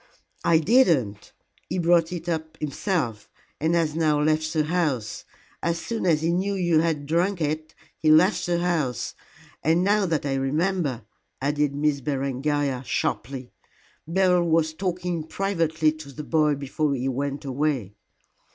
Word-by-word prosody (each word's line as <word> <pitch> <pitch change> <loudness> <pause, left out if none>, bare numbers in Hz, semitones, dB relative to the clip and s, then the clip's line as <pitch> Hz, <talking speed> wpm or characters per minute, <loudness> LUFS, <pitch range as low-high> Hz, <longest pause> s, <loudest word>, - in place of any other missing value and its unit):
"I 170 - +5
did 235 - +5
not. 110 - 0 0.4
He - - -2
brought 170 -1 +3
it 175 -1 -6
up 160 -1 -3
himself, 145 - -2 0.3
and 160 +3 +1
has 165 -3 +1
now 155 -2 +2
left 155 +1 +1
the 155 -1 +1
house. 150 -10 -1 0.4
As 170 0 0
soon 185 +4 -3
as 160 -2 +3
he 165 - +2
knew 195 +3 0
you 175 -4 +2
had 160 -3 0
drunk 175 +5 +1
it, 155 0 -2 0.2
he 155 - +2
left 175 +7 +4
the 175 -1 +1
house. 165 -9 -1 0.5
And 165 +4 +3
now 205 0 +3
that 160 -4 -1
I 140 - 0
remember," 140 - -1 0.3
added 145 +1 0
Miss 145 -1 +1
Berengaria, 140 0 -1
sharply, 130 0 -3 0.6
"Beryl 180 0 +3
was 160 -1 +2
talking 180 -1 -2
privately 160 -3 0
to 155 -2 -10
the 150 +3 -7
boy 150 -1 +2
before 140 +1 -1
he 130 0 -2
went 140 +2 -3
away." 135 -6 -1
155 Hz, 150 wpm, -25 LUFS, 140-170 Hz, 0.6 s, I